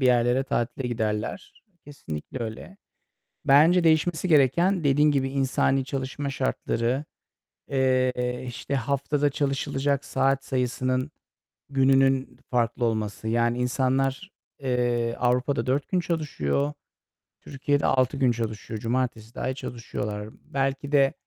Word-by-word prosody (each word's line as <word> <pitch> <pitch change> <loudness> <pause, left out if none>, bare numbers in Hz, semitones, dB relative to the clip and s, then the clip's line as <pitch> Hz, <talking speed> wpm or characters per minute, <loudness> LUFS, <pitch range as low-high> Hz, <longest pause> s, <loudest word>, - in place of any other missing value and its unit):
bir 130 - +3
yerlere 125 +1 +3
tatile 120 0 -2
giderler. 110 - -3 0.2
Kesinlikle 130 - -7
öyle. 115 - -7 0.7
Bence 160 +6 +6
değişmesi 160 +2 +2
gereken, 170 +5 +3
dediğin 145 +1 +4
gibi, 135 -1 +1
insani 135 0 +1
çalışma 135 +1 -3
şartları, 130 0 -1 0.6
eee, 130 -2 +1
işte, 125 +3 -5
haftada 140 +3 0
çalışılacak 140 0 -1
saat 135 0 +1
sayısının, 130 +1 -1 0.6
gününün 135 -1 +3
farklı 120 -1 0
olması. 110 -1 -2
Yani, 120 +1 +1
insanlar, 135 +6 0 0.3
eee, 120 -2 0
Avrupa'da 125 0 +1
4 135 +2 0
gün 185 - +1
çalışıyor. 75 - -1 0.7
Türkiye'de 145 +1 -1
6 130 +1 +2
gün 130 -3 +3
çalışıyor. 110 -1 -4
Cumartesi 120 -2 -2
dâhil 130 - -2
çalışıyorlar. 105 -4 -5 0.2
Belki 135 +1 -2
de, 140 -1 +4
130 Hz, 110 wpm, -26 LUFS, 120-140 Hz, 0.7 s, Bence